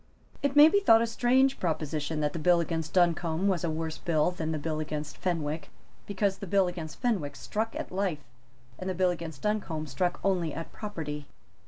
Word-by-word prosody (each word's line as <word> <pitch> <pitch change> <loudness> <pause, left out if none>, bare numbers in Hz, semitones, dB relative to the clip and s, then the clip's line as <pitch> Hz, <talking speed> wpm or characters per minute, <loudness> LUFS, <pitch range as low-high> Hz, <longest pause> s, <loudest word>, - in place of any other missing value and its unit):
It 280 0 0
may 295 +1 +10
be 405 +5 +4
thought 225 - +6
a - - +2
strange 255 +4 +2
proposition 155 -2 -2
that 150 -1 0
the 165 - -3
bill 175 +2 +4
against 160 -1 -2
Duncombe 175 0 +2
was 185 -4 +1
a 170 - 0
worse 160 0 -3
bill 160 0 +1
than 160 -3 -3
the 155 - -1
bill 155 +1 -2
against 150 -1 -4
Fenwick, 160 -4 -2 0.4
because 200 -1 0
the 200 - -6
bill 195 0 +3
against 170 -3 -6
Fenwick 190 - -1
struck 220 +8 -3
at - - -5
life, 185 -6 -1 0.6
and 185 - -3
the 185 - -2
bill 180 0 +3
against 165 -5 -7
Duncombe 200 -7 -1
struck 175 +6 -1
only 175 -6 +1
at 165 +1 -6
property. 155 -9 -5
170 Hz, 195 wpm, -29 LUFS, 155-195 Hz, 0.6 s, may